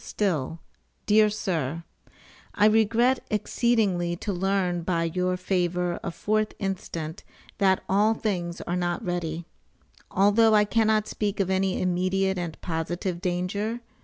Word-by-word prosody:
STILL, 165 -6 -1 0.5
DEAR 215 0 +5
SIR: 165 -7 -2 0.7
I 210 - +4
regret 225 +4 +4
exceedingly 210 -5 +1
to 200 +3 -4
learn 185 -1 0
by 170 -1 0
your 180 +2 0
favor 180 -1 0
of 170 - -6
4th 215 0 0
instant, 180 -4 -4 0.4
that 190 -2 +3
all 210 +3 +3
things 175 -6 -3
are 175 - -3
not 175 -1 -2
ready. 170 -2 -3 0.6
Although 210 +3 +4
I 210 0 +5
cannot 215 -1 +2
speak 210 -1 -2
of 190 -1 +1
any 190 0 +1
immediate 185 +1 0
and 170 -3 -5
positive 170 +1 -3
danger. 200 +5 -2
190 Hz, 130 wpm, -26 LUFS, 175-210 Hz, 0.7 s, DEAR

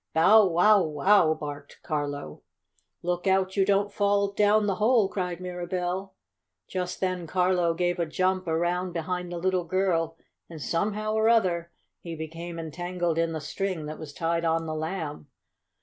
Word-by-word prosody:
"Bow 200 +6 +6
wow! 190 +4 +5
Wow!" 160 +1 +3
barked 145 -2 -8
Carlo. 145 - -4 0.6
"Look 175 +1 -1
out 190 0 +2
you 195 - +4
don't 200 +1 +1
fall 200 0 +2
down 210 +1 +3
the 195 -2 0
hole!" 225 -2 +4
cried 180 -3 -3
Mirabell. 180 +1 -4 0.5
Just 180 -1 -4
then 185 -2 -1
Carlo 180 -1 +2
gave 175 +1 0
a 170 - 0
jump 185 +3 0
around 175 +2 0
behind 180 +1 -3
the 175 - -4
little 185 +1 0
girl, 165 -3 0 0.3
and, 165 -2 -9
somehow 210 - -1
or 220 +1 +3
other, 180 -7 +2 0.3
he 170 -1 -7
became 165 +2 -7
entangled 175 +1 -2
in 165 0 +1
the 160 - -3
string 185 -2 -3
that 155 +1 -7
was 155 -2 -8
tied 165 +2 -1
on 165 0 +1
the 155 - -3
Lamb. 155 -2 -4
180 Hz, 160 wpm, -27 LUFS, 165-190 Hz, 0.6 s, Bow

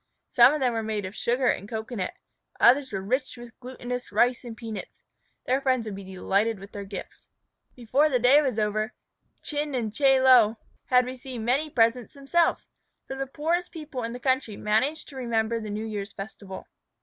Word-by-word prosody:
Some 240 +2 +7
of 305 - -1
them 250 -2 +2
were 225 - -1
made 215 -2 -3
of 190 +3 -7
sugar 250 +2 0
and 200 -4 0
cocoanut. 220 -3 -4 0.4
Others 265 +2 +5
were 195 -2 -3
rich 255 +5 -1
with 240 -1 -12
glutinous 250 -1 -6
rice 240 +5 +2
and 235 -2 -8
peanuts. 225 -3 -8 0.4
Their 260 +2 +1
friends 255 -4 +1
would 215 - -5
be 200 - -8
delighted 195 +4 0
with 195 +1 -12
their 200 -1 -7
gifts. 195 -1 -9 0.5
Before 260 +5 +2
the 260 - +2
day 250 +5 +6
was 265 -6 -1
over, 215 +1 -1 0.5
Chin 295 -1 -2
and 225 -4 -2
Chie 270 +1 +4
Lo 245 -4 +6 0.3
had 250 -1 +4
received 255 -2 -7
many 270 +7 +1
presents 230 -1 +1
themselves, 305 +5 +1 0.4
for 270 - -6
the 270 0 -3
poorest 335 +6 -1
people 305 -6 -6
in 230 0 -3
the 245 - -7
country 260 -5 0
manage 240 +9 0
to 280 - -13
remember 230 -2 0
the 215 -1 -6
New 210 +2 -3
Year's 210 -2 -5
festival. 195 -2 -8
240 Hz, 185 wpm, -26 LUFS, 215-265 Hz, 0.5 s, Some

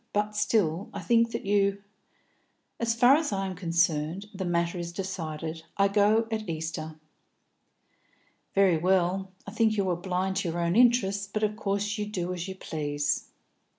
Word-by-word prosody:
But 210 0 +1
I - - -18
still 205 -4 0
think 230 +5 +3
that 230 -2 -5
you 200 0 +1 0.5
" - - -44
"As 230 -1 +1
far 245 +3 +6
as 315 -5 -1
I 195 -1 -1
am 190 -1 -4
concerned, 170 0 0
the 190 -1 -4
matter 170 0 0
is 170 0 -4
decided. 165 -4 -5 0.2
I 200 0 +4
go 210 +3 +3
at 215 -3 -3
Easter." 160 -1 -4 1.6
"Very 195 -4 +5
well. 185 +2 +1
I 200 - -7
think 220 0 +2
you 195 -2 +1
are - - +1
blind 185 +1 -2
to 195 -3 -1
your 170 +1 -3
own 170 +1 +1
interest, 205 -5 +3
but 215 - -1
of 210 0 +1
course 205 0 -2
you 210 - -2
do 180 -3 -3
as 175 0 -5
you 190 - -6
please. 145 -4 -2
190 Hz, 175 wpm, -28 LUFS, 170-210 Hz, 1.6 s, far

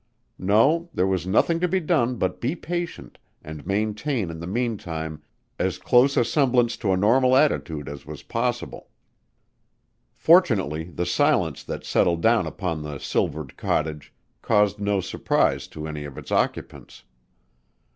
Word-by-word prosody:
No, 135 - +3
there 90 - +2
was 95 -2 -1
nothing 165 - +2
to 180 - +1
be 190 +2 +1
done 150 -8 +1
but - - -2
be 130 +8 -1
patient 175 0 -5 0.2
and 75 -1 -9
maintain 105 - -1
in 80 - -8
the 85 - -6
meantime 85 -9 -3 0.4
as 90 -1 0
close 125 +9 +3
a 120 - +4
semblance 125 -3 +2
to 100 - -1
a 95 - +2
normal 125 +6 +4
attitude 80 - +1
as 70 -1 -8
was - - -9
possible. - - -3 1.3
Fortunately 100 - +3
the 90 0 -4
silence 90 - +1
that - - -6
settled 85 -1 +1
down 115 0 +3
upon 85 -5 -3
the 75 -1 -6
silvered 70 0 -2
cottage 75 -2 -2 0.3
caused 105 -2 +2
no 100 -1 0
surprise 90 - 0
to 75 0 -7
any 75 -1 -5
of 70 -2 -10
its - - -9
occupants. - - -2
100 Hz, 145 wpm, -24 LUFS, 80-130 Hz, 1.3 s, a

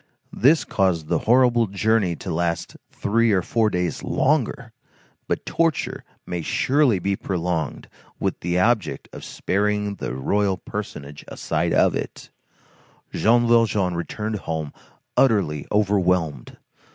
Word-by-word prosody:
This 150 +6 +3
caused 90 -6 0
the - - +2
horrible 120 -2 +4
journey 100 -2 +1
to 90 +1 -5
last 85 0 -2
three 115 +2 +1
or 95 -3 +2
four 110 +1 +1
days 90 -5 -2
longer; 135 -4 0 0.5
but - - -2
torture 165 -2 -1 0.2
may 90 -1 -4
surely 130 - +2
be 100 +2 -1
prolonged 90 -5 -3 0.3
with - - -2
the 90 +1 -1
object 110 +1 0
of - - -9
sparing 105 +1 -1
the 65 - -4
royal 95 +8 0
personage 75 -9 -7
a - - -9
sight - - -1
of - - +3
it. - - -6 0.8
Jean 120 +2 +3
Valjean 110 -6 +3
returned 105 +5 -3
home 80 -5 -4 0.4
utterly 100 - +2
overwhelmed. 90 - 0
100 Hz, 125 wpm, -23 LUFS, 85-115 Hz, 0.8 s, horrible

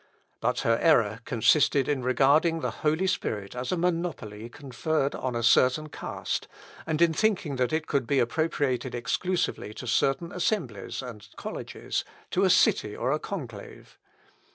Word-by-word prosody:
But - - 0
her 115 0 +2
error 115 -10 +3
consisted 135 +3 +3
in 145 -3 0
regarding 140 +6 +3
the - - -1
Holy 155 +4 +2
Spirit 105 - -2
as 125 +1 -3
a 180 - 0
monopoly 165 -11 -2
conferred 140 +2 -2
on 130 -2 -3
a 115 - -1
certain 130 +6 +4
caste, - - -4 0.4
and 155 -1 0
in 165 -1 +3
thinking 175 -8 0
that 125 +1 +1
it 155 0 0
could 135 -6 -1
be 140 - +2
appropriated 130 -1 0
exclusively 125 - -1
to - - -7
certain 135 +7 +1
assemblies 150 - -2
and 105 -4 -9
colleges, - - -4 0.3
to - - +2
a - - +4
city 105 - +3
or 130 - -1
a 150 - +1
conclave. 125 - -8
135 Hz, 155 wpm, -27 LUFS, 120-160 Hz, 0.4 s, certain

